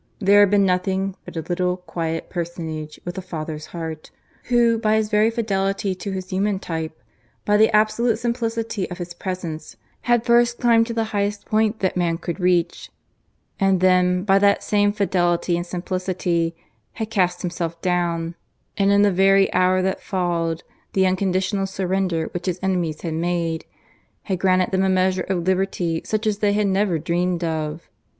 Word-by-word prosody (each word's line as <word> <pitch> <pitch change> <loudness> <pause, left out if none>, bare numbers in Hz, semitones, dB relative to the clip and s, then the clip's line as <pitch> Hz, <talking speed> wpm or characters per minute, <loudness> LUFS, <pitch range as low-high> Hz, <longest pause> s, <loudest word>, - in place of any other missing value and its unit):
There 200 0 +5
had 205 -1 +6
been 200 0 +4
nothing 190 +1 0
but - - -8
a - - -1
little 180 0 0
quiet 165 -2 -4
personage 160 -3 -5
with 175 +2 -4
a - - -5
father's 155 -3 -6
heart, 160 -2 -6 0.4
who 235 -2 +3
by 215 -1 +2
his 220 -1 +1
very 210 +1 +4
fidelity 195 -4 -1
to 185 +2 -6
his 185 -1 -5
human 195 +1 0
type, 160 -4 -5 0.5
by 210 - +3
the 220 +1 +5
absolute 220 +2 +2
simplicity 230 -3 -2
of 180 - -6
his 175 -1 -6
presence 175 -5 -5 0.3
had 240 -1 +3
first 240 0 +4
climbed 230 -2 +4
to 235 - -3
the 225 - +1
highest 205 0 -1
point 220 0 +1
that 190 - 0
man 170 -2 0
could 170 +1 -5
reach, 180 -2 +1 0.7
and 195 -2 +3
then 180 0 +3
by 195 -1 +4
that 200 0 +3
same 205 -1 +2
fidelity 175 -4 +1
and 175 +1 -3
simplicity, 175 -2 -2 0.4
had 220 -1 -5
cast 180 -4 +1
himself 170 -1 -3
down, 170 -2 0 0.4
and 200 -1 +3
in 200 0 +5
the 205 - +4
very 195 +1 +4
hour 185 0 +3
that 190 0 -1
followed 170 -3 -1 0.3
the 190 -1 +3
unconditional 190 +1 0
surrender 190 -3 -1
which 175 +1 -5
his 180 -1 -1
enemies 175 -5 -1
had 165 -2 -3
made, 165 0 -1 0.6
had 190 -3 -2
granted 185 -1 +2
them 190 0 +1
a 190 - +2
measure 185 0 +1
of 180 -3 0
liberty 185 -3 0
such 215 +1 -2
as 210 -1 0
they 205 -1 +2
had 210 0 +1
never 195 -2 +1
dreamed 175 +2 -1
of. 160 -1 -3
185 Hz, 170 wpm, -22 LUFS, 175-205 Hz, 0.7 s, had